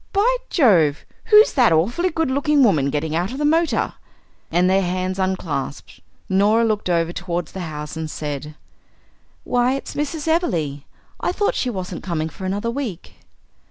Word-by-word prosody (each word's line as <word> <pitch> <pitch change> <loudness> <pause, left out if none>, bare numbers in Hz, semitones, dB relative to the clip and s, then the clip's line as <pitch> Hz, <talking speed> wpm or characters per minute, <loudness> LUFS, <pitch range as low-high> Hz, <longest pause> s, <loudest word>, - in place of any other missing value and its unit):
"By 440 +5 +3
Jove! 175 - +3 0.2
who's 425 0 +6
that 245 - +4
awfully 230 - +2
good 320 -4 -1
looking 285 +1 +3
woman 155 - +3
getting 150 +2 -2
out 175 +5 -1
of - - -5
the 295 - 0
motor?" 325 +2 +1 0.6
And 175 +2 +2
their 190 +1 +3
hands 185 +1 -2
unclasped. 175 -7 -3 0.3
Norah 205 +4 +3
looked 215 -4 -1
over 170 -1 +1
towards 175 -2 -4
the 190 - -7
house 150 -3 -6
and 160 -1 -4
said: 150 0 -5 0.9
"Why, 245 +2 +1
it's 275 - -6
Mrs. 295 +1 -3
Everleigh. 165 - 0 0.3
I - - 0
thought 410 +3 0
she 255 - -1
wasn't 185 -5 -5
coming 160 -3 -2
for 190 - -9
another 205 +5 -2
week." 235 -9 -5
190 Hz, 160 wpm, -21 LUFS, 165-275 Hz, 0.9 s, who's